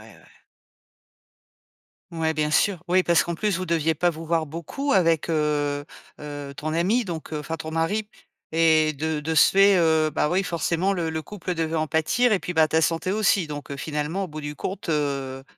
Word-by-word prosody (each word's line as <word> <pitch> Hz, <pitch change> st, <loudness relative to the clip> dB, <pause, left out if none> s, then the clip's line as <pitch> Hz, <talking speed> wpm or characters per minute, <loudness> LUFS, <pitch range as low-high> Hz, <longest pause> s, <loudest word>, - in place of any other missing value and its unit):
ouais. -, -, -21 dB, 1.9 s
Ouais, 160 Hz, -1 st, -1 dB
bien 150 Hz, 0 st, 0 dB
sûr. 180 Hz, 0 st, +2 dB
Oui, 185 Hz, +1 st, +4 dB
parce 170 Hz, -1 st, +3 dB
qu'en 170 Hz, -, -3 dB
plus, 200 Hz, 0 st, -1 dB
vous 185 Hz, -, -4 dB
deviez 165 Hz, -1 st, +1 dB
pas 175 Hz, -1 st, +2 dB
vous 165 Hz, +1 st, -9 dB
voir 165 Hz, -1 st, 0 dB
beaucoup 170 Hz, -, -3 dB
avec, 165 Hz, -4 st, +2 dB
heu 145 Hz, -2 st, 0 dB, 0.4 s
heu, 145 Hz, -1 st, -7 dB
ton 155 Hz, +2 st, -4 dB
ami, 205 Hz, +8 st, +1 dB
donc 160 Hz, -3 st, -6 dB
enfin 155 Hz, +2 st, -4 dB
ton 160 Hz, -, -6 dB
mari, 200 Hz, +7 st, -1 dB, 0.4 s
et 160 Hz, -1 st, +3 dB
de 155 Hz, +2 st, -2 dB
de 160 Hz, +2 st, -3 dB
ce -, -, +7 dB
fait, 195 Hz, 0 st, +5 dB
heu, 160 Hz, -2 st, +3 dB
bah 150 Hz, -, 0 dB
oui, 190 Hz, +2 st, +1 dB
forcément, 175 Hz, +2 st, 0 dB
le 170 Hz, -3 st, -2 dB
le 160 Hz, 0 st, -3 dB
couple 185 Hz, -3 st, -5 dB
devait 160 Hz, 0 st, -1 dB
en 155 Hz, 0 st, 0 dB
pâtir, 220 Hz, +11 st, +2 dB
et 195 Hz, -, +3 dB
puis, 180 Hz, -, -5 dB
bah 160 Hz, -1 st, +4 dB
ta 160 Hz, +1 st, +2 dB
santé 165 Hz, +3 st, 0 dB
aussi, 200 Hz, -5 st, +2 dB
donc 145 Hz, -1 st, -7 dB
heu, 140 Hz, -, -5 dB
finalement, 155 Hz, +6 st, -3 dB
au -, -, -10 dB
bout 155 Hz, -1 st, -8 dB
du 150 Hz, 0 st, -6 dB
compte, 190 Hz, +1 st, -5 dB
heu 140 Hz, -3 st, -2 dB
160 Hz, 200 wpm, -24 LUFS, 155-180 Hz, 1.9 s, ce